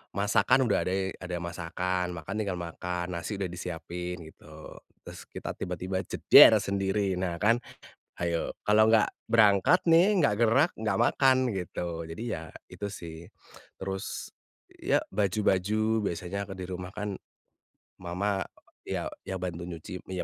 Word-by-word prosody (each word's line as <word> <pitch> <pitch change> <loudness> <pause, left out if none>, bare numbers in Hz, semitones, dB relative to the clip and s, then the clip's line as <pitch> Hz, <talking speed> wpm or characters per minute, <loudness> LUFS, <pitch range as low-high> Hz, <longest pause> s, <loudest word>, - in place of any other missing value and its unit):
masakan 120 +5 +3
udah 100 - +2
ade 95 0 -1
ada 90 -1 -3
masakan, 90 +1 -2
makan 95 +6 -6
tinggal 95 -4 -2
makan, 90 +1 -4
nasi 100 +4 -4
udah 95 - -1
disiapin 90 0 -5
gitu. 75 0 -13 0.3
Terus - - -10
kita - - -6
tiba-tiba 95 +2 -3
jeder, - - +8
sendiri, 100 0 0
nah 90 -2 -1
kan, 115 +6 +3 0.6
hayo, 85 -1 -1 0.2
kalau 110 +1 +5
nggak 110 -2 +5 0.2
berangkat 115 - +5
nih, 180 +4 +5
nggak 105 -9 +3
gerak, 135 +9 +4
nggak 105 -3 0
makan, 130 +2 +4 0.2
gitu. 85 -2 -4
Jadi 80 +8 -6
ya, 80 0 -5 0.2
itu 100 - -5
sih. 85 -4 -8 0.6
Terus, 95 +1 -5 0.5
ya - - +2
baju-baju 105 +2 +1
biasanya 90 +4 -4
aku 95 - -6
di 90 - -4
rumah 90 0 -6
kan 105 -1 -3 0.9
mama 95 +3 -1 0.4
ya - - -3 0.2
ya 95 - -3
bantu 85 -1 -4
nyuci, 90 +1 -7
ya 90 -1 -2
95 Hz, 140 wpm, -28 LUFS, 90-105 Hz, 0.9 s, jeder